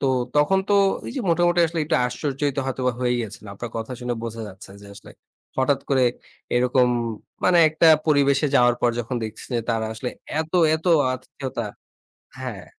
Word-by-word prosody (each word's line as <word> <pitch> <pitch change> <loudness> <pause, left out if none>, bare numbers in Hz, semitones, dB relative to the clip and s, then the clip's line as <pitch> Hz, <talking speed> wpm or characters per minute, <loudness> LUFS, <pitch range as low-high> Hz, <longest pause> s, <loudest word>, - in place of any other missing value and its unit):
তো - - 0 0.3
তখন 150 +7 +4
তো - - +2 0.3
ঐ - - -7
যে - - -2
মোটামুটি 175 +1 +3
আসলে 165 +1 -5
একটু 160 +1 +1
আশ্চর্যিত 140 +2 -2
হয়তোবা 130 -1 -1
হয়ে 125 -1 +1
গিয়েছেন, 110 -2 -6
আপনার 115 +3 -7
কথা 115 +3 -4
শুনে 120 0 -2
বোঝা 115 0 -5
যাচ্ছে 95 -1 -12
যে - - -12
আসলে। 105 - -13 0.5
হঠাৎ 135 +1 +2
করে 130 -2 +3 0.5
এরকম 125 +1 +3 0.6
মানে 180 -1 +5
একটা 155 +2 +2 0.2
পরিবেশে 140 -1 +3
যাওয়ার 120 0 +5
পর 120 - +3
যখন 120 +2 -4
দেখছি 110 0 -7
যে 120 - +1
তারা 115 -1 0
আসলে 120 +3 -4 0.3
এত, 160 0 -6 0.2
এত 160 - -5 0.3
আতিথেয়তা 130 -1 -6 0.8
হ্যাঁ। - - -6
130 Hz, 170 wpm, -23 LUFS, 120-150 Hz, 0.8 s, মানে